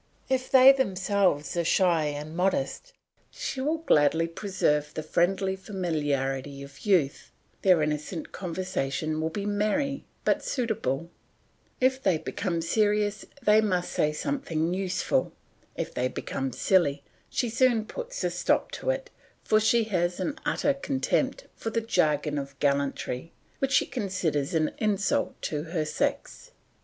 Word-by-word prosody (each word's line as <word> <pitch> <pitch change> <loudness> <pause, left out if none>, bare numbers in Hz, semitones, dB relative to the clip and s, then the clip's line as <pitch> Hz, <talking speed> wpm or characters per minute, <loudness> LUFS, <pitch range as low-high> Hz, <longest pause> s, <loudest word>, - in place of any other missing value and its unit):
If 255 -1 0
they 265 0 +9
themselves 190 - +1
are 170 - +1
shy 170 -2 +3
and 150 +2 -4
modest, 270 - -1 0.4
she 260 - -4
will 305 +4 +1
gladly 160 - +3
preserve 165 -5 -1
the 155 - -3
friendly 190 +4 +1
familiarity 145 -8 -2
of 140 +8 -12
youth; 165 -9 +2 0.3
their 180 -5 +5
innocent 150 +2 -3
conversation 160 -4 -2
will 160 - 0
be 200 +5 -4
merry 215 +7 0 0.2
but - - +2
suitable; 170 - -2 0.7
if 260 +1 +2
they 190 -9 +2
become 170 0 -3
serious 210 +2 +1 0.2
they 210 +1 +6
must 180 -4 0
say 150 - +1
something 170 - -1
useful; 190 -1 0 0.4
if - - -4
they 125 - 0
become 135 +1 -4
silly, 145 -3 +2 0.3
she 245 - 0
soon 235 -1 +2
puts - - -6
a - - +1
stop - - +1
to - - -4
it, - - -2 0.3
for 215 - +4
she 225 +2 +3
has 175 -4 -1
an 295 - -2
utter 285 - +1
contempt 275 - -1
for 225 - -4
the 230 - 0
jargon 150 -9 +1
of 140 0 -8
gallantry, 140 0 -1 0.3
which 270 0 0
she - - +4
considers 180 - -1
an 155 -1 +2
insult 205 -3 0
to 150 -2 -2
her 160 -2 -2
sex. - - -3
185 Hz, 140 wpm, -27 LUFS, 150-220 Hz, 0.7 s, they